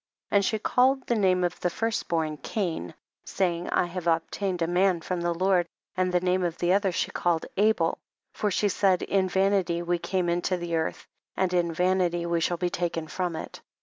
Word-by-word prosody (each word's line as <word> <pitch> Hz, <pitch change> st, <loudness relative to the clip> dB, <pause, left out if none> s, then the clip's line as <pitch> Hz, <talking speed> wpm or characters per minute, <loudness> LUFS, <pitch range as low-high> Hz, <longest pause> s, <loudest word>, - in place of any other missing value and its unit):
13. -, -, 0 dB
And 200 Hz, -, 0 dB
she 220 Hz, -, +1 dB
called 260 Hz, +4 st, +2 dB
the 240 Hz, -, +1 dB
name 185 Hz, -4 st, +2 dB
of 175 Hz, -1 st, -1 dB
the 180 Hz, -, 0 dB
first 225 Hz, +5 st, -2 dB
born 160 Hz, -2 st, -1 dB
Cain, 165 Hz, -, -3 dB, 0.3 s
saying, 175 Hz, -2 st, -1 dB
I -, -, +2 dB
have 175 Hz, 0 st, -5 dB
obtained 175 Hz, +2 st, 0 dB
a -, -, 0 dB
man 180 Hz, 0 st, +2 dB
from 180 Hz, +1 st, -3 dB
the 175 Hz, 0 st, 0 dB
Lord, 185 Hz, -1 st, +2 dB, 0.3 s
and 185 Hz, -1 st, +1 dB
the 180 Hz, -, +3 dB
name 180 Hz, +1 st, +1 dB
of 170 Hz, -2 st, -2 dB
the 175 Hz, +1 st, +2 dB
other 200 Hz, 0 st, +2 dB
slie -, -, -2 dB
called 170 Hz, -2 st, 0 dB
Abel, 200 Hz, -5 st, +2 dB, 0.3 s
for 210 Hz, -, -1 dB
she 205 Hz, +2 st, +1 dB
said, 190 Hz, -2 st, +2 dB
in 190 Hz, -1 st, +1 dB
vanity 190 Hz, -2 st, +1 dB
we 175 Hz, 0 st, 0 dB
came 185 Hz, 0 st, -1 dB
into 175 Hz, +2 st, 0 dB
the 170 Hz, -1 st, -3 dB
earth 160 Hz, 0 st, -2 dB, 0.3 s
and 185 Hz, -1 st, +1 dB
in 175 Hz, -1 st, +2 dB
vanity 180 Hz, 0 st, +1 dB
we 170 Hz, -1 st, 0 dB
shall 175 Hz, +1 st, 0 dB
be 175 Hz, 0 st, -1 dB
taken 170 Hz, -2 st, -2 dB
from 175 Hz, 0 st, -2 dB
it. 160 Hz, -, -7 dB
180 Hz, 210 wpm, -27 LUFS, 170-190 Hz, 0.3 s, the